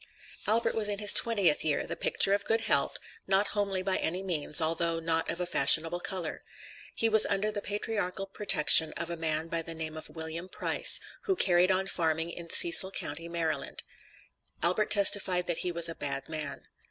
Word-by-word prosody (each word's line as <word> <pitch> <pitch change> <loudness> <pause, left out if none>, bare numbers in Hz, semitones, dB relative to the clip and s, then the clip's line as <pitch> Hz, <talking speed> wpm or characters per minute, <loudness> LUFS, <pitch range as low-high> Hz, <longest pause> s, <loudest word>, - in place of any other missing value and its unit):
Albert 225 +3 +1
was 215 -2 0
in 205 - -3
his 205 0 +3
twentieth 200 -10 +3
year, 150 -2 -1
the - - -4
picture 195 - +2
of 200 0 -1
good 225 +2 0
health, - - +1 0.3
not 195 +1 +1
homely 200 -3 -2
by 190 0 -1
any 180 +4 -3
means, 160 -4 -1
although 165 +1 -1
not 165 0 -2
of 170 - -5
a 180 - -2
fashionable 165 +2 +3
color. 175 -2 -4 0.5
He 230 - 0
was 220 -1 +5
under 205 +1 -1
the 205 -1 -4
patriarchal 205 -2 -4
protection 175 -5 +3
of 170 0 -6
a - - -4
man 160 -1 -2
by 165 0 -3
the 165 0 -9
name 160 -1 -7
of 155 - -9
William 160 +2 -8
Price, - - +3 0.3
who 390 -3 0
carried 180 - +2
on 190 0 0
farming 165 -2 -3
in 170 0 -10
Cecil 330 - +6
county, 165 -2 -6
Maryland. 165 -2 -4 0.8
Albert 185 +5 +1
testified 195 -3 +4
that 175 -2 -3
he 180 - -2
was 170 -1 +1
a 165 - -5
bad 135 -3 -4
man. 155 -3 -6
175 Hz, 190 wpm, -28 LUFS, 165-200 Hz, 0.8 s, Cecil